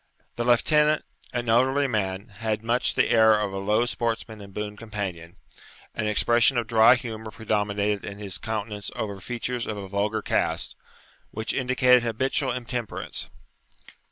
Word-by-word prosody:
The 120 - -2
lieutenant, 150 +5 +3 0.3
an 120 -1 -3
elderly 130 +5 +3
man, 100 -4 -2
had 110 +1 -3
much 120 +3 +1
the - - +3
air 110 -2 +6
of 100 -2 -2
a 95 - -3
low 105 +4 +2
sportsman 115 -2 -3
and 100 -1 -11
boon 105 +1 -5
companion; 100 -7 -6 0.6
an 105 -1 -2
expression 120 +4 +4
of 120 - +1
dry 115 +2 +6
humour 110 -3 -6
predominated 105 -2 -1
in 100 0 -7
his 100 -3 -4
countenance 105 -2 -4
over 100 -2 -4
features 120 +3 -3
of 105 - -3
a 100 -1 -6
vulgar 105 +2 -1
cast, - - 0 0.5
which 110 +1 -3
indicated 125 -1 +4
habitual 130 +3 0
intemperance. 120 -2 -4
110 Hz, 150 wpm, -25 LUFS, 105-120 Hz, 0.6 s, air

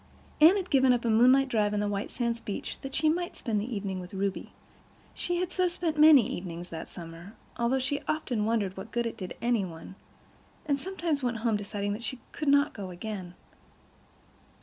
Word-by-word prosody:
Anne 330 +5 +9
had 375 -2 -4
given 265 -2 +5
up 240 -1 +1
a 230 - +3
moonlight 255 +5 +5
drive 210 -4 +1
to - - 0
the 205 0 0
White 205 0 -2
Sands 235 -1 -2
beach 205 - -5
that 270 0 -6
she 315 - +2
might 345 +3 0
spend 220 -5 -1
the 235 +5 -5
evening 195 -2 -3
with 180 +1 -9
Ruby. 195 0 -2 0.6
She 350 - -2
had 365 0 -1
so 365 0 +2
spent 345 -2 -2
many 300 -7 +8
evenings 175 -7 -6
that 160 -1 -7
summer, 170 +3 -10 0.2
although 235 +2 +2
she 280 +2 -1
often 250 -8 -1
wondered 210 -4 0
what 190 +3 -8
good 235 0 0
it 230 - -3
did 185 -5 -7
any 235 -3 +2
one, 165 0 -8 0.7
and 285 -2 +1
sometimes 340 -4 -2
went 245 -2 -1
home 225 -2 +3
deciding 205 0 -3
that 210 - -6
she 255 +1 -5
could 305 - -5
not 285 +1 +4
go 200 -4 -6
again. 180 -1 -6
230 Hz, 200 wpm, -29 LUFS, 200-280 Hz, 0.7 s, Anne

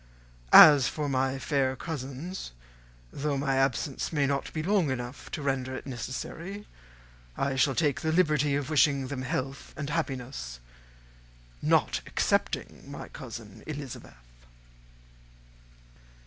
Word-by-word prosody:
As 145 -4 +10
for 150 -2 -2
my 135 0 0
fair 135 -1 0
cousins, 145 - -6 0.6
though 145 0 -1
my 135 -1 0
absence 135 +3 0
may 145 -3 +2
not 140 0 -1
be 155 - -3
long 190 -4 +2
enough 125 0 -5
to 150 - -5
render 130 -1 -1
it - - -7
necessary, 165 +10 -6 0.7
I 135 0 0
shall 135 0 +2
now - - +2
take 145 -4 +1
the 160 - 0
liberty 150 -4 +3
of 145 +1 -2
wishing 140 -3 +3
them 135 -2 -4
health 135 0 -4
and 150 0 -4
happiness, 130 - -4 1.0
not - - +2
excepting - - -1
my - - -8
cousin 110 -2 -9
Elizabeth." 145 - -7
140 Hz, 125 wpm, -28 LUFS, 130-150 Hz, 1.0 s, As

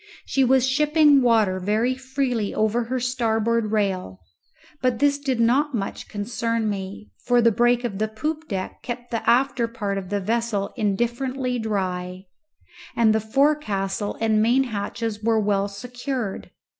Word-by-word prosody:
She 270 - +1
was 260 0 +3
shipping 300 +1 +4
water 220 -6 +3
very 215 +7 +1
freely 260 -4 -2
over 220 +2 +1
her 255 +2 -2
starboard 230 -3 0
rail, 190 - -1 0.6
but 255 -2 +1
this 285 +1 +2
did 265 -4 -1
not 260 +5 +2
much 195 -3 -4
concern 225 +1 -2
me, 200 +1 -5
for 245 0 +3
the 230 -1 +5
break 240 +2 +2
of 205 -5 -3
the 215 - +1
poop 305 +9 -4
deck 190 -3 -5
kept 240 0 -6
the 230 - -1
after 255 -1 +2
part 205 -4 -3
of 185 -2 -9
the 205 0 0
vessel 220 0 -1
indifferently 245 +4 -1
dry, 185 -4 -3 0.7
and 225 -2 +4
the 220 - +2
forecastle 220 -6 0
and 220 -1 +2
main 245 +4 +3
hatches 220 -1 -4
were 225 0 +2
well 200 -1 +1
secured. 245 +1 -5
230 Hz, 150 wpm, -23 LUFS, 205-255 Hz, 0.7 s, the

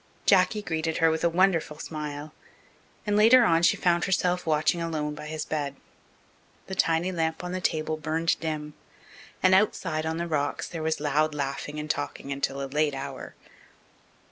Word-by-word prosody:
Jacky 195 +2 +4
greeted 160 -3 -2
her 165 0 +4
with 160 0 -2
a 170 - +4
wonderful 170 -3 +2
smile, 150 -1 -6 0.7
and 205 -1 +1
later 230 +4 +7
on 165 -6 +3
she 170 - +4
found 175 -1 +2
herself 180 -1 0
watching 155 +2 +2
alone 155 -3 -2
by 150 0 -8
his 155 0 -4
bed. 145 -3 -3 0.9
The 190 - -7
tiny 170 0 +1
lamp 160 -1 -2
on 180 - -4
the 185 0 -3
table 155 -2 -1
burned 160 +2 0
dim, 155 -2 -4 0.7
and 185 0 +5
outside, 165 -5 +1
on 160 0 -2
the 170 - -2
rocks, 145 -3 -1
there 165 - -6
was 160 0 -1
loud 150 +1 +1
laughing 145 +1 -4
and 150 - -5
talking 145 -1 -3
until 140 0 -2
a - - -2
late 150 +1 0
hour. 135 0 -7
160 Hz, 170 wpm, -27 LUFS, 150-175 Hz, 0.9 s, later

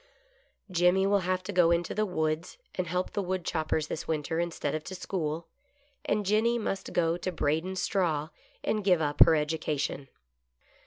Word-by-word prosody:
Jimmy 180 +2 +4
will 200 0 +3
have 185 0 0
to 195 - -4
go 175 -2 +5
into 170 0 +1
the 215 0 0
woods 160 - -2 0.2
and 185 -1 -2
help 180 +2 -1
the 205 - -1
woodchop 180 -4 -2
pers 155 -1 +1
this 155 - -5
winter 160 +1 -1
instead 170 -4 -2
of 155 - -2
to 190 - -6
school, 170 -3 -3 0.6
and 210 -1 0
Jenny 220 +4 +3
must 195 -4 -3
go 165 0 +1
to 185 +1 -3
braidin' 160 +3 0
straw, 175 -5 0 0.3
and 215 -1 0
give 185 -3 +4
up 145 -2 -1
her 165 - +4
education. 150 -2 -1
175 Hz, 170 wpm, -29 LUFS, 155-190 Hz, 0.6 s, go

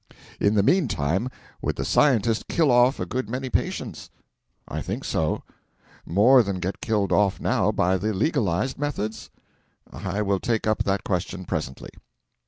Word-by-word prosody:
In 100 +1 +2
the 100 - +4
meantime 105 - +1 0.3
would - - -1
the - - -3
Scientist 115 -6 +2
kill 160 -5 +2
off 125 +3 +4
a - - -1
good 130 -2 -3
many 130 +2 -4
patients? - - -3 0.6
I - - -4
think - - -4
so. - - -1 0.6
More 115 +9 +6
than 100 -4 -2
get 95 +2 -4
killed 105 -3 0
off 100 -2 +2
now - - +1
by 95 +2 +1
the 105 +3 -1
legalised 105 - 0
methods? 115 -7 -3 0.6
I 105 +1 -3
will 100 -1 +1
take 115 +1 -1
up 110 0 +1
that 95 0 0
question 95 0 -3
presently. 65 -5 -4
105 Hz, 155 wpm, -24 LUFS, 95-125 Hz, 0.6 s, More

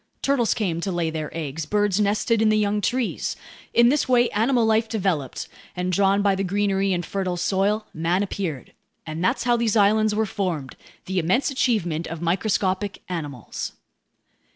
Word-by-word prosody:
Turtles 270 -5 +2
came 175 -6 -1
to 195 - -2
lay 170 -2 -1
their 155 -1 -4
eggs. 155 -1 -4
Birds 205 +1 +1
nested 210 +2 +2
in 220 - +4
the 215 - +3
young 210 0 +1
trees. 245 +3 -1 0.4
In 235 0 +5
this 285 0 +1
way 245 -1 +4
animal 235 +2 +2
life 220 0 +2
developed, 180 - -2 0.3
and 180 0 -1
drawn 195 +2 +3
by 200 -1 +4
the 195 0 -1
greenery 195 0 +1
and 175 -2 -1
fertile 185 -1 -2
soil, 200 +4 +1
man 170 +4 +1
appeared. 180 - -4 0.3
And 160 +2 -4
that's 240 +7 +1
how 240 -1 +3
these 230 -2 +1
islands 215 +1 +3
were 220 +1 +1
formed, 175 -10 -3 0.3
the 190 0 -1
immense 190 - +1
achievement 175 - 0
of 165 - -6
microscopic 190 +2 -1
animals. 145 -9 -5
195 Hz, 170 wpm, -24 LUFS, 175-220 Hz, 0.4 s, In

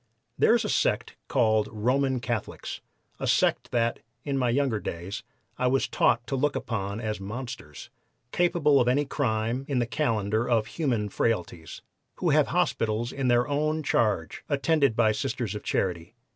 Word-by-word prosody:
There - - +4
is - - 0
a - - -2
sect - - 0
called 110 -4 +2
Roman 130 +4 +1
Catholics 120 -4 -4 0.4
a - - -2
sect - - +2
that, 115 -1 0 0.2
in 140 -2 -2
my 125 -2 +1
younger 125 -3 +1
days, 90 +2 -5 0.4
I 125 - +2
was 135 +1 +2
taught 120 0 +2
to 135 - -2
look 145 +2 +1
upon 100 -2 -3
as 110 -3 -3
monsters, 110 - -7 0.4
capable 165 -5 +3
of 120 - +1
any 140 +4 +2
crime 120 -2 -1
in 140 - -1
the 120 - +2
calendar 115 -4 0
of 115 -3 +3
human 120 -6 -1
frailties 90 -6 -2 0.3
who - - 0
have - - +4
hospitals 115 +2 0
in 135 -2 -2
their 120 0 +3
own 155 +2 0
charge 105 - 0
attended 145 -3 +2
by 110 -2 +4
Sisters 110 - -2
of - - -5
Charity. 90 +3 -2
120 Hz, 160 wpm, -27 LUFS, 110-135 Hz, 0.4 s, There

